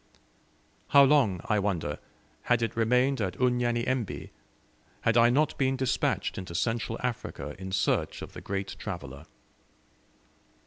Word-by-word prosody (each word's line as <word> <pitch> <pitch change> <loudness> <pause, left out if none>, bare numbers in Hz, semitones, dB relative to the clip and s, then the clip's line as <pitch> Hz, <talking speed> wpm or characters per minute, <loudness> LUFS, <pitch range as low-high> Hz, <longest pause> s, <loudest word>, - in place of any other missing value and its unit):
How 140 - +7
long, 130 - +3
I 105 - +2
wonder, 85 -8 -2 0.5
had 120 -1 +3
it 115 - -2
remained 125 +3 +2
at 95 -3 -2
Unyanyembe 125 -1 0 0.7
had 115 - +2
I 120 0 +6
not 145 +5 +2
been 135 -1 +2
despatched 130 -6 0
into 90 -2 -7
Central 115 +3 -1
Africa 115 -11 -4
in 95 0 -6
search 100 +1 0
of - - -10
the - - -8
great 100 0 -4
traveller? 80 -7 -7
115 Hz, 130 wpm, -28 LUFS, 95-125 Hz, 0.7 s, How